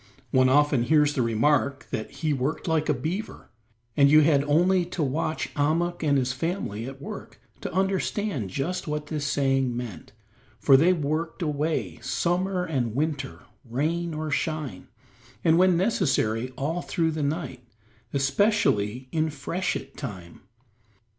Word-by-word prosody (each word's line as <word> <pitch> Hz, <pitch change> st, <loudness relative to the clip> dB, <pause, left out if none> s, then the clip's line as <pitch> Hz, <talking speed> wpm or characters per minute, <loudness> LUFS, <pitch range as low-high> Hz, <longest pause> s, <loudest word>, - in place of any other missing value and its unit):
One 130 Hz, 0 st, +4 dB
often 145 Hz, -1 st, +4 dB
hears 150 Hz, 0 st, +4 dB
the 135 Hz, -, 0 dB
remark 135 Hz, +4 st, +1 dB
that 110 Hz, -, -3 dB
"he 155 Hz, -2 st, -2 dB
worked 140 Hz, +6 st, -2 dB
like 160 Hz, -2 st, +1 dB
a -, -, +4 dB
beaver," 170 Hz, -, -5 dB, 0.4 s
and 140 Hz, -1 st, +6 dB
you 155 Hz, +1 st, +7 dB
had 145 Hz, -2 st, +4 dB
only 175 Hz, +5 st, +3 dB
to 175 Hz, -2 st, -3 dB
watch 155 Hz, +3 st, -2 dB
Ahmuk 165 Hz, +4 st, 0 dB
and 145 Hz, -3 st, +2 dB
his 130 Hz, -1 st, 0 dB
family 130 Hz, -, -3 dB
at 135 Hz, 0 st, -8 dB
work 140 Hz, -, -8 dB, 0.2 s
to -, -, -4 dB
understand 190 Hz, -, -1 dB
just 165 Hz, -, -3 dB
what 150 Hz, 0 st, -2 dB
this 150 Hz, -2 st, -3 dB
saying 135 Hz, -3 st, +1 dB
meant, 120 Hz, -6 st, -7 dB, 0.5 s
for 135 Hz, -, +5 dB
they 165 Hz, +7 st, +5 dB
worked 160 Hz, +1 st, -2 dB
away 145 Hz, -, -1 dB
summer 180 Hz, +1 st, 0 dB
and 125 Hz, -9 st, -2 dB
winter, 145 Hz, -2 st, -2 dB, 0.2 s
rain 155 Hz, +7 st, -2 dB
or 155 Hz, 0 st, -3 dB
shine, 145 Hz, -, -2 dB, 0.6 s
and, 165 Hz, 0 st, +4 dB
when 185 Hz, -2 st, +5 dB
necessary, 135 Hz, -, +1 dB
all 160 Hz, +6 st, -1 dB
through 165 Hz, -1 st, 0 dB
the 155 Hz, -1 st, -3 dB
night, 140 Hz, -4 st, -3 dB, 0.5 s
especially 135 Hz, -, +1 dB
in 160 Hz, -1 st, +1 dB
freshet 160 Hz, +5 st, -3 dB
time. 95 Hz, -, -8 dB
150 Hz, 145 wpm, -26 LUFS, 135-165 Hz, 0.6 s, you